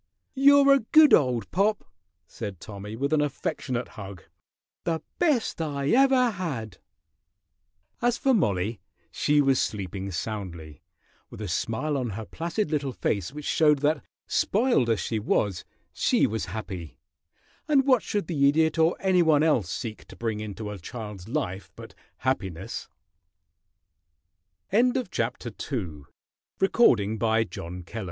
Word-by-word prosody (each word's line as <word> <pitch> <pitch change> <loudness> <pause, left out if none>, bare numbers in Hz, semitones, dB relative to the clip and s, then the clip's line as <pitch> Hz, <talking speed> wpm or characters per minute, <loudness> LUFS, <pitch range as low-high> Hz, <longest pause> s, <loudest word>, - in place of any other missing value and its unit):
"You're 280 0 +6
a 275 - +4
good 305 +6 +6
old 125 -6 +3
pop!" 205 +3 +1 0.4
said 100 +2 -7
Tommy, 105 +2 -8
with 140 +5 -1
an 155 - +3
affectionate 130 -3 -3
hug. 95 -5 -9 0.6
"The 165 -1 -1 0.2
best 290 - +1
I 140 -3 -2
ever 260 -1 +4
had!" 135 - -5 1.2
As 240 0 +2
for 270 - +2
Mollie, 105 - 0 0.3
she 150 0 +2
was 135 -2 +3
sleeping 100 -1 -3
soundly, 85 -6 -6 0.5
with - - -11
a 105 - -4
smile 115 - -1
on 125 -3 -2
her 110 - -5
placid 170 - -3
little 140 -4 -1
face 100 -2 -1
which 150 +1 -8
showed 150 -2 +4
that, 150 0 +2 0.2
"spoiled" 215 - +2
as 115 - +2
she 110 - -2
was, 100 -3 0 0.3
she - - +2
was 110 0 -2
happy; 90 -5 -6 0.7
and 280 -3 +4
what 255 -5 +4
should 205 -4 -2
the 140 -4 +3
Idiot 160 +2 +2
or 160 +2 +3
any 190 -2 +3
one 155 -3 +4
else 125 - +2
seek 110 +4 -5
to - - -12
bring 115 -2 -3
into 105 0 -6
a 100 - -7
child's 105 -1 -8
life 110 -9 -3
but - - -11 0.2
happine 100 -10 -1
135 Hz, 125 wpm, -26 LUFS, 105-170 Hz, 1.2 s, You're